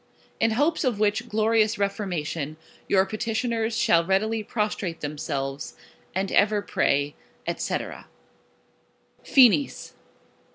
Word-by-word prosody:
In 225 Hz, 0 st, +2 dB
hopes 310 Hz, +5 st, +2 dB
of 245 Hz, -6 st, 0 dB
which 210 Hz, 0 st, +1 dB
Glorious 220 Hz, 0 st, +2 dB
Reformation, 170 Hz, -7 st, -2 dB, 0.3 s
your 190 Hz, -1 st, +4 dB
Petitioners 225 Hz, +2 st, -1 dB
shall 170 Hz, -7 st, +4 dB
readily 215 Hz, +5 st, +1 dB
Prostrate 210 Hz, -5 st, -3 dB
themselves, 145 Hz, -2 st, -4 dB, 0.4 s
and 190 Hz, +1 st, -1 dB
ever 205 Hz, 0 st, +3 dB
Pray, 145 Hz, -4 st, +1 dB, 0.4 s
&c. -, -, -1 dB, 1.5 s
FINIS. 270 Hz, +1 st, +4 dB
205 Hz, 95 wpm, -25 LUFS, 170-225 Hz, 1.5 s, your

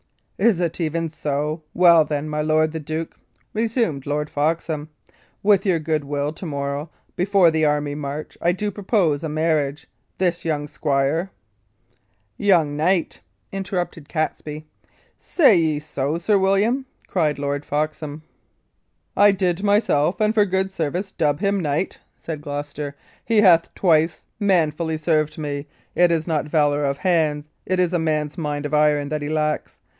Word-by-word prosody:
"Is 225 Hz, -7 st, +3 dB
it 175 Hz, 0 st, -1 dB
even 165 Hz, 0 st, -1 dB
so? 150 Hz, +1 st, -2 dB
Well, 170 Hz, -2 st, +7 dB
then, 150 Hz, 0 st, -3 dB
my 150 Hz, 0 st, -2 dB
lord 155 Hz, 0 st, +2 dB
the 160 Hz, -, -4 dB
duke," 155 Hz, +2 st, -5 dB, 0.4 s
resumed 220 Hz, -, -1 dB
Lord 150 Hz, +1 st, -2 dB
Foxham, 155 Hz, 0 st, -1 dB, 0.5 s
"with 200 Hz, -2 st, +4 dB
your 180 Hz, -3 st, +3 dB
good 155 Hz, -1 st, -1 dB
will, 145 Hz, +1 st, -2 dB
to 180 Hz, -, -8 dB
morrow, 140 Hz, +1 st, -3 dB, 0.3 s
before 185 Hz, -2 st, +4 dB
the 160 Hz, -1 st, +2 dB
army 150 Hz, -1 st, 0 dB
march, 145 Hz, +1 st, -5 dB
I 175 Hz, -, +3 dB
do 205 Hz, +3 st, -2 dB
propose 190 Hz, -7 st, 0 dB
a 160 Hz, -, -2 dB
marriage. 150 Hz, -2 st, 0 dB, 0.3 s
This 180 Hz, -2 st, 0 dB
young 150 Hz, -3 st, -1 dB
squire 145 Hz, +5 st, 0 dB, 0.6 s
" 100 Hz, +1 st, -43 dB
"Young 160 Hz, -6 st, +4 dB
knight," 170 Hz, +3 st, 0 dB, 0.3 s
interrupted 180 Hz, -5 st, -4 dB
Catesby. 155 Hz, -1 st, -3 dB, 0.5 s
"Say 275 Hz, -, +4 dB
ye 155 Hz, -3 st, +1 dB
so, 150 Hz, 0 st, -2 dB
Sir 200 Hz, +4 st, +2 dB
William?" 210 Hz, +8 st, +2 dB, 0.2 s
cried 155 Hz, -5 st, 0 dB
Lord 140 Hz, 0 st, -2 dB
Foxham. 155 Hz, 0 st, -3 dB, 0.9 s
"I 205 Hz, 0 st, +6 dB
did 185 Hz, -2 st, 0 dB
myself, 200 Hz, -6 st, +2 dB
and 215 Hz, 0 st, +2 dB
for 210 Hz, -2 st, +4 dB
good 190 Hz, +1 st, 0 dB
service, 180 Hz, +3 st, -3 dB
dub 145 Hz, -2 st, 0 dB
him 200 Hz, -1 st, +1 dB
knight," 155 Hz, +2 st, -1 dB, 0.2 s
said 155 Hz, -3 st, -6 dB
Gloucester. 145 Hz, 0 st, -5 dB, 0.3 s
"He 225 Hz, -2 st, +3 dB
hath 170 Hz, -5 st, +5 dB
twice 160 Hz, -3 st, +2 dB, 0.2 s
manfully 165 Hz, -5 st, +1 dB
served 155 Hz, -1 st, 0 dB
me. 145 Hz, -1 st, -4 dB, 0.3 s
It 175 Hz, 0 st, +4 dB
is 165 Hz, -2 st, 0 dB
not 155 Hz, -3 st, 0 dB
valour 145 Hz, -2 st, +2 dB
of 140 Hz, 0 st, -1 dB
hands, 155 Hz, -5 st, +1 dB, 0.2 s
it 185 Hz, 0 st, 0 dB
is 180 Hz, -1 st, +2 dB
a 175 Hz, -, +2 dB
man's 155 Hz, 0 st, -1 dB
mind 145 Hz, -2 st, -3 dB
of 145 Hz, -, -4 dB
iron, 150 Hz, -1 st, +3 dB
that 155 Hz, 0 st, -2 dB
he 145 Hz, -, -3 dB
lacks. 155 Hz, -1 st, -1 dB
155 Hz, 155 wpm, -22 LUFS, 150-180 Hz, 0.9 s, Well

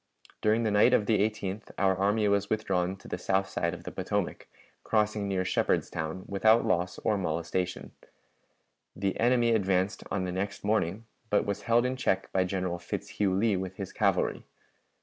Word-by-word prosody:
During 110 Hz, +2 st, +2 dB
the 110 Hz, -, +1 dB
night 105 Hz, +5 st, +5 dB
of 105 Hz, -, +1 dB
the 110 Hz, 0 st, +2 dB
18th 105 Hz, -1 st, -2 dB
our 95 Hz, -1 st, +3 dB
army 105 Hz, +3 st, +2 dB
was 100 Hz, 0 st, +1 dB
withdrawn 95 Hz, -4 st, 0 dB
to 95 Hz, -, -15 dB
the 90 Hz, -, -4 dB
south 95 Hz, +1 st, +1 dB
side 85 Hz, -2 st, -1 dB
of -, -, -12 dB
the -, -, -6 dB
Potomac, -, -, -3 dB, 0.4 s
crossing 105 Hz, -1 st, +1 dB
near 95 Hz, -2 st, 0 dB
Shepardstown, 85 Hz, -1 st, -1 dB
without 110 Hz, +3 st, +4 dB
loss 90 Hz, +1 st, 0 dB
or 105 Hz, -2 st, +1 dB
molestation. 90 Hz, +1 st, -2 dB, 1.0 s
The 95 Hz, 0 st, -2 dB
enemy 120 Hz, 0 st, +3 dB
advanced 95 Hz, -2 st, +1 dB
on 95 Hz, -, -1 dB
the 90 Hz, -, -2 dB
next 100 Hz, +3 st, -3 dB
morning, 105 Hz, 0 st, 0 dB, 0.2 s
but 105 Hz, -, +2 dB
was 100 Hz, -1 st, -2 dB
held 120 Hz, +1 st, +4 dB
in 130 Hz, +1 st, -1 dB
check 95 Hz, -6 st, 0 dB
by 95 Hz, -1 st, +2 dB
General 90 Hz, -2 st, -2 dB
Fitzhugh 95 Hz, +2 st, -2 dB
Lee 105 Hz, +1 st, +2 dB
with 95 Hz, 0 st, -4 dB
his 95 Hz, -1 st, -6 dB
cavalry. -, -, +1 dB
100 Hz, 170 wpm, -29 LUFS, 95-110 Hz, 1.0 s, night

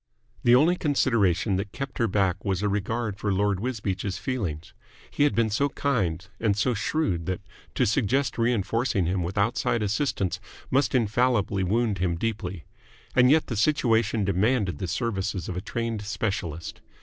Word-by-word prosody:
The 120 Hz, 0 st, +6 dB
only 160 Hz, +7 st, +5 dB
consideration 110 Hz, -, +2 dB
that 100 Hz, +1 st, -4 dB
kept 135 Hz, -1 st, -6 dB
her 115 Hz, -, +3 dB
back 95 Hz, -2 st, 0 dB
was 95 Hz, -1 st, -1 dB
a -, -, +2 dB
regard 105 Hz, +1 st, -2 dB
for 100 Hz, +1 st, -1 dB
Lord 100 Hz, 0 st, +1 dB
Wisbeach's 100 Hz, -5 st, -3 dB
feelings. 90 Hz, -, -4 dB, 0.4 s
He 145 Hz, -, +2 dB
had 145 Hz, -, +1 dB
been 115 Hz, -2 st, +2 dB
so 140 Hz, +7 st, +1 dB
kind 95 Hz, -, -1 dB
and 105 Hz, -3 st, +1 dB
so 120 Hz, +4 st, +2 dB
shrewd 100 Hz, -, -1 dB
that 95 Hz, -1 st, -1 dB, 0.4 s
to -, -, +3 dB
suggest 120 Hz, +4 st, +1 dB
reinforcing 115 Hz, -2 st, +1 dB
him 90 Hz, +2 st, 0 dB
with 90 Hz, +4 st, -4 dB
outside 105 Hz, +2 st, +1 dB
assistance 105 Hz, -, -1 dB, 0.3 s
must 135 Hz, +1 st, +2 dB
infallibly 115 Hz, -3 st, +2 dB
wound 105 Hz, +1 st, +1 dB
him 90 Hz, -2 st, 0 dB
deeply. 95 Hz, -3 st, -3 dB, 0.5 s
And 125 Hz, 0 st, +6 dB
yet 155 Hz, +2 st, +4 dB
the 120 Hz, -, -4 dB
situation 115 Hz, -4 st, +2 dB
demanded 100 Hz, +1 st, +1 dB
the 95 Hz, -, -3 dB
services 95 Hz, -3 st, -2 dB
of 90 Hz, -, -4 dB
a 90 Hz, -, -3 dB
trained 115 Hz, 0 st, -3 dB
specialist. 100 Hz, -6 st, -4 dB
105 Hz, 160 wpm, -26 LUFS, 95-120 Hz, 0.5 s, The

